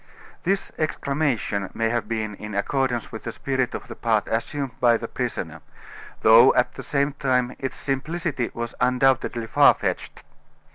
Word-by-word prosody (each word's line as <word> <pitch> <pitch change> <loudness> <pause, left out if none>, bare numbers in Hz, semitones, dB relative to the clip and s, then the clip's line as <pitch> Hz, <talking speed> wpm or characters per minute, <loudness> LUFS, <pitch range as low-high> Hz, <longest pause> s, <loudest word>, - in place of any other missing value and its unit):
This 195 +2 -1
exclamation 140 -10 -1
may 115 0 +1
have 120 0 -1
been 110 -2 -2
in 105 +1 -7
accordance 120 +2 -1
with 110 - -7
the 115 - -4
spirit 130 +1 -2
of - - -7
the - - -8
part 110 -3 +1
assumed 135 +4 -2
by 120 -2 +4
the 115 - -6
prisoner; 85 - -4 0.6
though, 115 +4 +8
at 125 - +2
the - - -8
same 140 0 0
time, 130 -3 0
its 135 - -4
simplicity 145 -1 -2
was 115 0 -4
undoubtedly 125 -2 +2
far 110 - +5
fetched. - - -4
125 Hz, 155 wpm, -24 LUFS, 115-135 Hz, 0.6 s, though